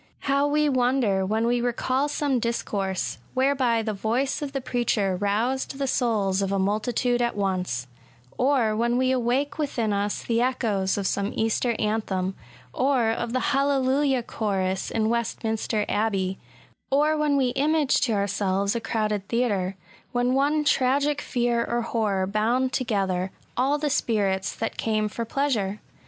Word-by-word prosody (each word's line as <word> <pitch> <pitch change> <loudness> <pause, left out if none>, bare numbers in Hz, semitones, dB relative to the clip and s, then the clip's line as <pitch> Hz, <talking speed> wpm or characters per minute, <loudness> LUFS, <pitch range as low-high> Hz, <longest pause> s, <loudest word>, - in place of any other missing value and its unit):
How 280 +1 +2
we 300 +1 +2
wonder 245 -7 +2
when 220 +3 +1
we 240 0 +1
recal 255 +3 0
some 285 -3 0
discourse, 200 -5 -2 0.2
whereby 260 -4 +2
the 215 -1 -2
voice 240 +9 -1
of 290 -2 -3
the 275 - -2
preacher 235 -6 0
roused 225 +8 -1
the 275 - -1
souls 215 -7 +1
of 195 0 -1
a 200 - +1
multi 210 +5 0
tude 245 +1 +1
at 240 0 0
once,^ 185 -11 -1 0.3
— 120 +2 -30
or 250 -5 +2
when 235 +2 +1
we 260 0 +2
awake 260 +4 0
within 235 -8 0
us 200 +1 -1
the 230 0 +1
echoes 220 -7 0
of 200 - -2
some 200 +2 0
Easter 225 +2 +1
anthem, 205 -3 -1 0.4
or 255 -4 +2
of 235 +1 -3
the 255 +3 0
Hallelujah 275 -1 +2
Chorus 190 -4 -2
in 220 -1 0
Westminster 225 -2 -1
Abbey, 195 -3 0 0.3
— - - -33
or 295 +3 +3
when 300 -2 +2
we 260 -2 +2
image 290 +2 +2
to 235 - +1
ourselves 200 0 0
a 235 - -1
crowded 215 -3 -1
theatre, 205 -6 0 0.4
when 245 +1 +1
one 290 +3 +2
tragic 285 +1 +2
fear 240 -1 0
or 240 0 -1
horror 210 -5 0
bound 230 +6 0
together 195 -6 0 0.3
all 270 +4 +2
the 295 -1 -1
spirits 200 -7 0
that 225 - -3
came 215 -1 0
for 230 +2 -4
pleasure 220 -6 -1
235 Hz, 160 wpm, -25 LUFS, 205-260 Hz, 0.4 s, or